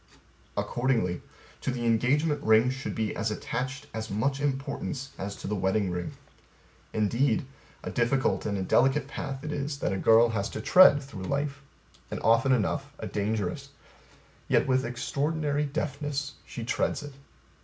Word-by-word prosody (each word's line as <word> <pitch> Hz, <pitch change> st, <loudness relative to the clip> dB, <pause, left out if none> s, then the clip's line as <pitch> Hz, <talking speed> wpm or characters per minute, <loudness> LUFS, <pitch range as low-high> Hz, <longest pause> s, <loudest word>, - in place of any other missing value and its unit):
Accordingly 120 Hz, -8 st, 0 dB, 0.4 s
To -, -, -2 dB
the 125 Hz, -2 st, -2 dB
engagement 140 Hz, +7 st, +2 dB
ring 110 Hz, +3 st, +5 dB
should 130 Hz, 0 st, -5 dB
be 110 Hz, -2 st, -1 dB
as 110 Hz, +1 st, -1 dB
attached 130 Hz, +6 st, -3 dB
as 110 Hz, 0 st, -4 dB
much 135 Hz, +8 st, 0 dB
importance 135 Hz, -1 st, -3 dB
as 100 Hz, +1 st, -4 dB
to -, -, -7 dB
the 105 Hz, -, -1 dB
wedding 95 Hz, 0 st, +1 dB
ring. 90 Hz, 0 st, -4 dB, 0.8 s
Indeed, 120 Hz, -, +1 dB, 0.4 s
A -, -, -4 dB
difficult 130 Hz, +1 st, +1 dB
and 100 Hz, -1 st, -1 dB
a 95 Hz, -, -1 dB
delicate 135 Hz, +7 st, +3 dB
path 135 Hz, -1 st, -5 dB
it 155 Hz, -, -4 dB
is 145 Hz, 0 st, -3 dB
that 120 Hz, -, -1 dB
a -, -, -1 dB
girl 115 Hz, +3 st, +6 dB
has 100 Hz, -3 st, -1 dB
to -, -, -5 dB
tread 145 Hz, +3 st, +7 dB
through 100 Hz, -9 st, -8 dB
life 140 Hz, +3 st, -2 dB, 0.5 s
and -, -, -4 dB
often 115 Hz, +4 st, +4 dB
enough 120 Hz, -6 st, +1 dB
a -, -, -6 dB
dangerous. 105 Hz, -3 st, -2 dB, 0.8 s
Yet -, -, +3 dB
with 130 Hz, 0 st, +2 dB
extraordinary 145 Hz, +4 st, -1 dB
deftness 145 Hz, 0 st, -3 dB
she 120 Hz, -, -6 dB
treads 125 Hz, -, 0 dB
it. 145 Hz, -1 st, -8 dB
130 Hz, 155 wpm, -28 LUFS, 110-140 Hz, 0.8 s, tread